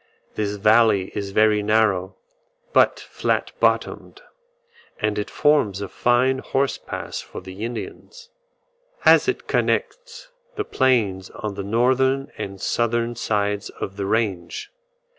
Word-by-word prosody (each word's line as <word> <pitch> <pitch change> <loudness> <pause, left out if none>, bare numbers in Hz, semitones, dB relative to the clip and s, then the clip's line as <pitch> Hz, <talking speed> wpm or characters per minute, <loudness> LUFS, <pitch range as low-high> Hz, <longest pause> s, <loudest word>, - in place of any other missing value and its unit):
This 105 -1 -2
valley 105 -2 +3
is 100 -1 -4
very 105 +1 +3
narrow, 105 -3 +1 0.6
but - - +4
flat - - -2
bottomed, - - 0 0.8
and 105 -1 0
it 105 - -4
forms 145 -10 +2
a 100 - -4
fine 125 +5 +2
horse 135 +1 -1
pass - - -6
for - - -9
the 95 +3 -9
Indians, 290 - -7 0.7
as - - +6
it - - -1
connects - - -2 0.3
the 420 - -2
plains 110 - +1
on 105 -3 -5
the 100 - -5
northern 130 +5 +1
and 95 0 -6
southern 120 +2 0
sides 105 -2 -1
of 95 - -7
the 100 -1 -3
range. 100 -6 -2
110 Hz, 125 wpm, -22 LUFS, 100-130 Hz, 0.8 s, as